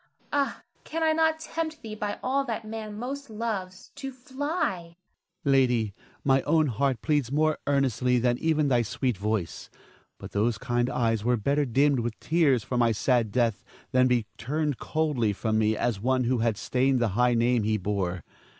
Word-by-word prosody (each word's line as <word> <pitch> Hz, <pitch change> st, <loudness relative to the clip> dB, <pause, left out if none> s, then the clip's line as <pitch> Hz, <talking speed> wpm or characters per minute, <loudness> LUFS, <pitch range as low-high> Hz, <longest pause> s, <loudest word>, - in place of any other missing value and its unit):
Ah, 285 Hz, -1 st, 0 dB, 0.2 s
can 325 Hz, +1 st, -3 dB
I 320 Hz, -, +4 dB
not 320 Hz, 0 st, +2 dB
tempt 315 Hz, -1 st, -4 dB
thee 220 Hz, -1 st, -6 dB
by 210 Hz, -1 st, -3 dB
all 275 Hz, +2 st, +1 dB
that 230 Hz, -3 st, -4 dB
man 215 Hz, -1 st, -6 dB
most 275 Hz, +3 st, -5 dB
loves, 210 Hz, -4 st, -4 dB
to 270 Hz, -1 st, -5 dB
fly? 265 Hz, -, -2 dB
Ernest. 170 Hz, 0 st, -16 dB, 0.5 s
Lady, 125 Hz, -6 st, +3 dB, 0.3 s
my 135 Hz, -1 st, +3 dB
own 155 Hz, +3 st, +3 dB
heart 130 Hz, -1 st, 0 dB
pleads 145 Hz, -6 st, +1 dB
more 155 Hz, +1 st, +2 dB
earnestly 130 Hz, -3 st, +2 dB
than 120 Hz, 0 st, +1 dB
even 155 Hz, -2 st, +2 dB
thy 125 Hz, -3 st, +3 dB
sweet 125 Hz, +1 st, -1 dB
voice; 105 Hz, -2 st, -3 dB, 0.5 s
but -, -, -9 dB
those 110 Hz, +2 st, +1 dB
kind 120 Hz, 0 st, 0 dB
eyes 115 Hz, -4 st, 0 dB
were 120 Hz, +1 st, +2 dB
better 140 Hz, +6 st, +1 dB
dimmed 135 Hz, +2 st, +3 dB
with 115 Hz, -1 st, -3 dB
tears 150 Hz, -8 st, +2 dB
for 125 Hz, -, -3 dB
my 120 Hz, -1 st, +4 dB
sad 115 Hz, 0 st, +1 dB
death 115 Hz, -3 st, +1 dB, 0.3 s
than 130 Hz, 0 st, +4 dB
be 120 Hz, -3 st, +2 dB
turned 150 Hz, +2 st, -1 dB
coldly 145 Hz, -9 st, 0 dB
from 110 Hz, +2 st, 0 dB
me 110 Hz, 0 st, +2 dB
as 120 Hz, -5 st, 0 dB
one 130 Hz, +3 st, +1 dB
who 125 Hz, 0 st, +1 dB
had 115 Hz, -2 st, +1 dB
stained 130 Hz, +3 st, +1 dB
the 120 Hz, -2 st, +1 dB
high 120 Hz, +5 st, +2 dB
name 120 Hz, +1 st, +2 dB
he 110 Hz, +1 st, +1 dB
bore. 95 Hz, -3 st, -2 dB
130 Hz, 180 wpm, -27 LUFS, 115-185 Hz, 0.5 s, I